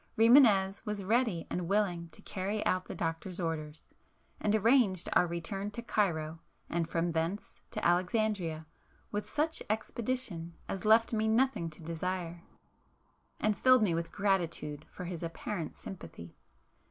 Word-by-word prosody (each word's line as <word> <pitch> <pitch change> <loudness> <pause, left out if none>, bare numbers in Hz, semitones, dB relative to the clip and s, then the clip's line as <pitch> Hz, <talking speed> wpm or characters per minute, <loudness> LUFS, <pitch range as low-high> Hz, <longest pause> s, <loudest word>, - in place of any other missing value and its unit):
Rimânez 220 -5 +6
was 210 -2 -3
ready 220 -4 +1
and 175 -1 -2
willing 180 -4 0
to - - -15
carry 200 +3 -3
out 185 0 +1
the - - -7
doctor's 165 +3 -3
orders,—and 160 +5 -4
arranged 220 -5 +3
our 180 - +4
return 170 +4 -4
to 230 +3 -6
Cairo 165 -8 0 0.3
and 165 -1 0
from 170 +1 0
thence 165 +5 -3
to - - -4
Alexandria, 175 -2 +1 0.5
with 210 0 -3
such 315 +2 0
expedition 215 -6 -3
as 195 +2 -4
left 225 +2 +5
me 220 0 +1
nothing 225 -6 +2
to 160 +1 -12
desire, 170 +1 -3 1.0
and 215 -1 +2
filled 255 -1 +5
me 185 -5 +2
with 165 0 -2
gratitude 170 -7 -1
for 180 - -8
his 175 -2 -5
apparent 170 +1 -4
sympathy. 85 - -10
185 Hz, 140 wpm, -32 LUFS, 165-215 Hz, 1.0 s, Rimânez